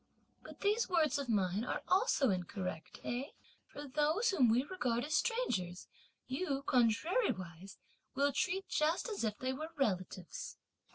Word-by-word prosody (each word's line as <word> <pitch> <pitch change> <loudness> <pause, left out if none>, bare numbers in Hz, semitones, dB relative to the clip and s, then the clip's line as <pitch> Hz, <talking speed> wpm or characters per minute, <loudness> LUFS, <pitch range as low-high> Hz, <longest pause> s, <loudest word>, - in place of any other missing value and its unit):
But - - -12
these 420 +2 +2
words 320 -5 +3
of 275 -3 -4
mine 200 -1 +1
are - - -3
also 365 - +3
incorrect, 180 -2 -4
eh? 245 +3 -2 0.4
for 290 0 -8
those 310 - +2
whom 260 -11 +4
we 240 +3 +4
regard 250 -8 -1
as 305 - -3
strangers 240 - 0 0.4
you, 275 0 -2
contrariwise, 220 - +1 0.4
will 280 +1 +2
treat 370 +6 0
just 310 +7 +1
as 415 - -3
if 210 -2 -1
they 260 0 -1
were 310 +4 -5
relatives!" 185 - -2
270 Hz, 145 wpm, -35 LUFS, 210-350 Hz, 0.4 s, whom